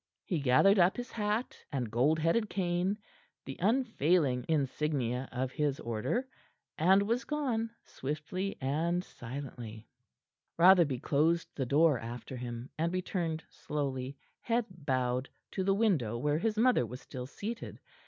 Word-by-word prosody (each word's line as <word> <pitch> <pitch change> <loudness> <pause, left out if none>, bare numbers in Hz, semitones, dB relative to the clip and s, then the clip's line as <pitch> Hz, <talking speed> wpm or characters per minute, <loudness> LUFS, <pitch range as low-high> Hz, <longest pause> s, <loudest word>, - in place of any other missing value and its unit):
He 175 -6 -1
gathered 145 +10 +5
up 175 +2 +4
his 245 +1 -5
hat 215 +2 -1 0.2
and 125 -6 -2
gold 135 +7 +3
headed 170 +8 +1
cane 180 +1 0 0.5
the 135 - -6
unfailing 175 - +2
insignia 135 -4 0
of 130 +1 -2
his 145 -2 0
order 120 - -1 0.5
and 190 +5 +5
was 235 +5 0
gone, 255 -7 -1
swiftly 155 +8 -4
and 165 +6 0
silently. 120 - -8 0.7
Rotherby 170 -6 +6
closed 160 +4 +2
the 130 -3 -2
door 150 0 +4
after 120 +3 -7
him, 120 0 -6
and 165 +1 +1
returned 175 -3 -2
slowly, 135 -2 -4 0.2
head 235 0 0
bowed, 130 -6 -1 0.2
to 190 - -1
the 195 +1 +3
window 165 - +2
where 150 +5 +1
his 220 +2 0
mother 245 - +4
was 125 +2 -6
still 125 -2 -7
seated. 220 - -6
155 Hz, 135 wpm, -32 LUFS, 130-195 Hz, 0.7 s, Rotherby